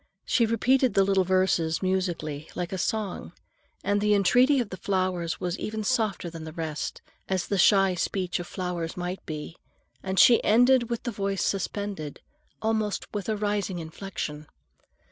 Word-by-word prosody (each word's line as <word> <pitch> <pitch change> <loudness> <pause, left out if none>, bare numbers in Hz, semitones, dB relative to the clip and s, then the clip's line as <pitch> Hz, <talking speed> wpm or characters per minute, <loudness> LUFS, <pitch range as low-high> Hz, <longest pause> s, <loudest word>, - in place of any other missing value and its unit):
She 230 -2 +3
repeated 250 +3 +2
the 195 - +5
little 195 -1 +3
verses 185 -3 +1
musically, 175 -5 -2
like 180 +1 -3
a 190 - -3
song, 200 - -2 0.5
and 205 +1 +1
the 210 0 +3
entreaty 250 +8 +4
of 235 -5 -2
the 185 - -5
flowers 185 -4 -1
was 180 +1 -3
even 215 0 -3
softer 220 -6 0
than 165 -1 -7
the 160 - -7
rest, 155 -2 -4 0.3
as 190 -2 0
the 200 - -1
shy 195 0 +5
speech 180 0 -1
of 175 - -6
flowers 180 -3 -4
might 180 +1 -4
be, 155 +1 -6 0.4
and 190 0 -3
she 235 - +7
ended 245 +2 +4
with 235 -1 -3
the 240 - -2
voice 195 -2 -2
suspended, 195 -5 -3 0.4
almost 220 -2 -1
with 205 0 -3
a 215 - 0
rising 205 -3 -1
inflection. 160 -3 -6
190 Hz, 165 wpm, -27 LUFS, 175-210 Hz, 0.5 s, she